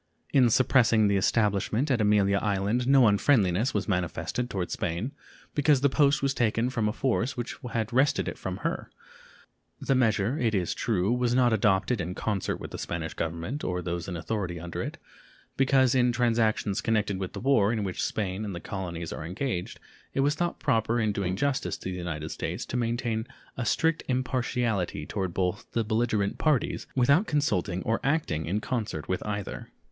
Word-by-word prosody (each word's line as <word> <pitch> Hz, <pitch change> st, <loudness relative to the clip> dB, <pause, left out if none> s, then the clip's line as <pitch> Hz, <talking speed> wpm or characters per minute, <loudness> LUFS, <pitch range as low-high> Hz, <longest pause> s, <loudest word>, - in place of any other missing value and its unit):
In 130 Hz, -4 st, +5 dB
suppressing 115 Hz, -3 st, +4 dB
the 100 Hz, -, +2 dB
establishment 105 Hz, +6 st, +1 dB
at 120 Hz, -4 st, +2 dB
Amelia 100 Hz, -1 st, +3 dB
Island 105 Hz, +4 st, 0 dB
no 135 Hz, -2 st, +6 dB
unfriendliness 105 Hz, 0 st, +3 dB
was 95 Hz, -3 st, 0 dB
manifested 95 Hz, +6 st, -2 dB
toward 95 Hz, -5 st, -3 dB
Spain, 90 Hz, +10 st, -2 dB, 0.4 s
because 145 Hz, -2 st, +3 dB
the 140 Hz, -, +4 dB
post 140 Hz, -2 st, +3 dB
was 135 Hz, 0 st, +2 dB
taken 115 Hz, +1 st, +1 dB
from 115 Hz, -4 st, 0 dB
a -, -, 0 dB
force 125 Hz, +1 st, -1 dB
which 120 Hz, 0 st, -4 dB, 0.2 s
had 115 Hz, 0 st, -1 dB
wrested 135 Hz, +3 st, +2 dB
it -, -, -3 dB
from -, -, -4 dB
her. -, -, -2 dB, 0.9 s
The -, -, +1 dB
measure, 115 Hz, 0 st, +2 dB
it 115 Hz, -3 st, +1 dB
is 90 Hz, -3 st, 0 dB
true, 105 Hz, -1 st, 0 dB
was 125 Hz, -1 st, +1 dB
not 125 Hz, -2 st, +4 dB
adopted 105 Hz, 0 st, +2 dB
in 90 Hz, +2 st, -4 dB
concert 100 Hz, -4 st, -1 dB
with -, -, -8 dB
the -, -, -6 dB
Spanish -, -, -4 dB
Government 85 Hz, -, -4 dB
or 90 Hz, 0 st, -1 dB
those 85 Hz, -1 st, -3 dB
in 90 Hz, -2 st, -4 dB
authority 85 Hz, -1 st, -3 dB
under 85 Hz, +1 st, -5 dB
it, -, -, -5 dB, 0.6 s
because 130 Hz, -2 st, +4 dB
in 125 Hz, -1 st, +3 dB
transactions 115 Hz, -4 st, +1 dB
connected 105 Hz, -4 st, 0 dB
with 95 Hz, -2 st, -4 dB
the -, -, -5 dB
war 115 Hz, -6 st, +3 dB
in 110 Hz, -3 st, -1 dB
which 95 Hz, -2 st, -3 dB
Spain 100 Hz, -1 st, -2 dB
and 100 Hz, -4 st, -4 dB
the -, -, -5 dB
colonies 85 Hz, -3 st, -5 dB
are -, -, -6 dB
engaged 90 Hz, -, -3 dB, 0.4 s
it 135 Hz, -, +2 dB
was 145 Hz, +2 st, +3 dB
thought 175 Hz, +2 st, -2 dB
proper 115 Hz, -3 st, +1 dB
in 110 Hz, -2 st, +1 dB
doing 95 Hz, -2 st, -1 dB
justice 140 Hz, +5 st, -1 dB
to 95 Hz, -, -5 dB
the -, -, -4 dB
United 80 Hz, -3 st, -4 dB
States -, -, -4 dB
to -, -, -6 dB
maintain 115 Hz, -1 st, -1 dB, 0.3 s
a 125 Hz, -, -3 dB
strict 160 Hz, +5 st, +2 dB
impartiality 125 Hz, -, -1 dB
toward 95 Hz, 0 st, -3 dB
both 90 Hz, +2 st, -2 dB
the 115 Hz, -, +1 dB
belligerent 110 Hz, -2 st, 0 dB
parties 150 Hz, -6 st, +1 dB
without 140 Hz, -, +4 dB
consulting 95 Hz, -, 0 dB
or 115 Hz, +1 st, 0 dB
acting 135 Hz, -, 0 dB
in 100 Hz, +5 st, 0 dB
concert 110 Hz, -, -3 dB
with 95 Hz, -, -2 dB
either. 105 Hz, -2 st, -4 dB
110 Hz, 185 wpm, -27 LUFS, 95-125 Hz, 0.9 s, no